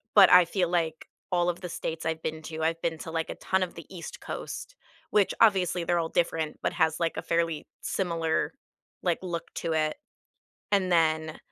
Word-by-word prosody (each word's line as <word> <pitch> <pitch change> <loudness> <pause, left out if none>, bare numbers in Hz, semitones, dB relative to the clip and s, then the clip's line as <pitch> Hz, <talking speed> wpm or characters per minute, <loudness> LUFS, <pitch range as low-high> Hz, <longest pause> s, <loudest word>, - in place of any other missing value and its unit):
but 200 -3 +9
I 180 -1 +9
feel 180 0 0
like 165 -2 -1 0.2
all 175 0 +2
of 175 - -3
the 180 - -4
states 160 -1 -4
I've 160 0 -1
been 160 0 -3
to, 160 0 -5
I've 165 +1 0
been 165 -1 -1
to, 160 - -6
like, 165 -1 -2
a - - -4
ton 190 0 +1
of 180 - -4
the 165 - -9
East 170 - -8
Coast, - - -6 0.4
which 205 -2 +3
obviously, 190 -5 +4
they're 175 0 +2
all 165 - 0
different, 160 -2 0
but - - +1
has, 160 +1 +2
like, 165 -1 0
a - - -1
fairly 165 -2 0
similar, 165 -4 0 0.5
like, 175 -2 +1
look 170 -2 -4
to 165 - -1
it, 155 -1 +1 0.7
and 195 -2 +3
then 160 -2 +2
165 Hz, 200 wpm, -28 LUFS, 160-180 Hz, 0.7 s, but